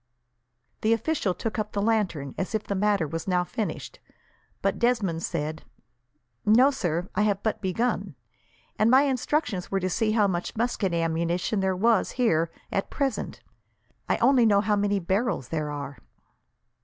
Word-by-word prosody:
The 220 +1 +3
official 230 - 0
took 220 +5 -3
up 210 0 -3
the 205 - -1
lantern, 195 - 0
as 190 +4 -3
if 215 - -1
the - - -3
matter 200 -4 +1
was 165 +4 -5
now 180 -1 +2
finished, 190 +5 -5 0.6
but - - 0
Desmond 215 -9 +1
said: 155 -1 -3 0.8
"No, 245 +6 +5
sir. 175 - -2
I - - +1
have 205 -2 +1
but 220 - -1
begun; 215 +6 -1 0.6
and 215 - +4
my 260 +3 +6
instructions 270 - -1
were 195 - 0
to 185 0 -2
see 215 +1 +1
how 215 -2 +4
much 180 -3 -2
musket 225 -4 0
ammunition 170 +4 0
there 190 -1 +1
was 225 +2 +2
here, 170 -10 +2 0.2
at 195 - -1
present. 275 -2 -2 0.7
I - - +2
only 265 -3 +4
know 200 -2 +4
how 210 0 +1
many 205 0 +1
barrels 190 - -1
there 155 -2 -2
are. 140 -1 -6
200 Hz, 160 wpm, -26 LUFS, 175-225 Hz, 0.8 s, my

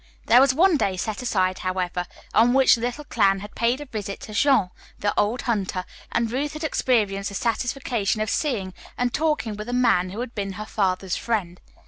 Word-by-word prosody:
There 245 +3 +6
was 275 -1 +5
one 335 +4 +4
day 190 -7 0
set 210 +5 -3
aside, 185 -6 0
however, 180 -1 -2 0.3
on 235 +2 +5
which 270 -1 +6
the 230 - 0
little 245 +5 -3
clan 195 -8 +2
had 210 +1 -9
paid 235 +3 +1
a 295 - -7
visit 210 -6 -5
to 215 - -9
Jean, 215 -5 +3 0.3
the 205 - 0
old 215 +4 +1
hunter, 195 -5 -1 0.3
and 230 -1 0
Ruth 285 +4 -2
had 305 +1 -6
experienced 210 -9 +1
the 200 - -8
satisfaction 235 -1 -1
of 215 0 -1
seeing 210 - -1 0.2
and 245 -1 0
talking 300 -9 0
with 210 +3 -7
a - - -3
man 235 -8 +3
who 205 +6 -5
had 245 -1 -6
been 195 -2 -3
her 210 +3 -6
father's 190 -3 -1
friend. 190 -7 -2
220 Hz, 200 wpm, -24 LUFS, 195-250 Hz, 0.3 s, There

